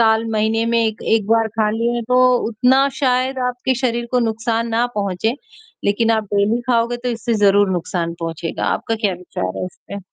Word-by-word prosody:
साल, 220 0 +3
महीने 220 +1 +1
में 230 -1 +2
1, 220 0 -3
1 220 -3 +2
बार 225 0 +3
खा 215 0 0
लिए 235 +2 -1
तो 250 0 +3 0.3
उतना 260 +5 +3
शायद 260 0 +1
आपके 250 +1 -1
शरीर 240 -2 -1
को 250 - +3
नुकसान 230 0 -1
ना 230 +2 +1
पहुँचे, 200 +4 -1 0.5
लेकिन 225 +3 +2
आप 220 -1 0
डेली 210 +4 +2
खाओगे 235 0 +1
तो - - 0
इससे 230 0 -2
ज़रूर 200 0 +4
नुकसान 170 -1 -2
पहुँचेगा। 165 0 -4
आपका 225 - -1
क्या 205 -4 0
विचार 175 - -5
है - - -2
इस 185 - -13
पे? 200 - -5
225 Hz, 190 wpm, -19 LUFS, 205-235 Hz, 0.5 s, ज़रूर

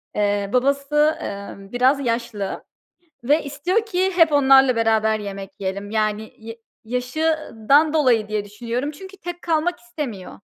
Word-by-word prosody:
eee, 205 -1 0
babası, 280 +4 +2
emm, 200 0 -7
biraz 255 +3 +3
yaşlı 230 -4 -3 0.6
ve 295 +6 +2
istiyor 350 +10 -1
ki 380 -2 0
hep 330 -3 +5
onlarla 270 -3 +5
beraber 220 -1 +2
yemek 195 -1 -7
yiyelim. 200 +1 -4
Yani, 215 0 -1
ya 225 +1 -9 0.3
yaşından 280 +2 +1
dolayı 250 -9 +2
diye 215 -1 -2
düşünüyorum 235 +6 -4
çünkü 380 +6 -12
tek 350 -2 -8
kalmak 335 +1 0
istemiyor. 235 -6 -7
250 Hz, 130 wpm, -22 LUFS, 215-300 Hz, 0.6 s, hep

